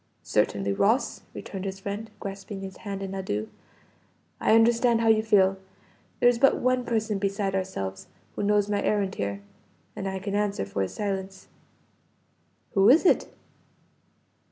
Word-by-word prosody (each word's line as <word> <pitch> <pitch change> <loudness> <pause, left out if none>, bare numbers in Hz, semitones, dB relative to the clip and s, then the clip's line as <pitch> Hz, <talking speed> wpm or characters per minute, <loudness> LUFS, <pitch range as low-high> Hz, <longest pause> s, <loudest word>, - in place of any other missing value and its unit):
"Certainly, 100 0 0
Ross!" 220 - +1
returned 195 -2 -7
his 195 -1 -5
friend, 205 +3 -5
grasping 195 0 -7
his 190 -1 -8
hand 200 -2 -5
in 195 0 -5
adieu. 110 - -3 0.9
"I 220 - +4
understand 230 +1 +4
how 225 - +3
you 220 -1 +5
feel. 195 -3 +3 0.6
There - - +5
is 245 -1 +4
but 275 +2 +5
one 255 0 +1
person 220 -3 -1
beside 195 0 -1
ourselves, 140 - -4 0.3
who - - -3
knows 205 0 +2
my 205 -1 0
errand 200 -2 0
here, 100 0 -4 0.5
and 195 - -4
I 190 - -3
can 195 +1 -5
answer 205 - 0
for 100 0 -3
his 95 - -3
silence." 195 -2 -4 1.2
"Who 195 +2 +5
is 310 +9 +6
it?" - - +3
200 Hz, 155 wpm, -26 LUFS, 190-220 Hz, 1.2 s, is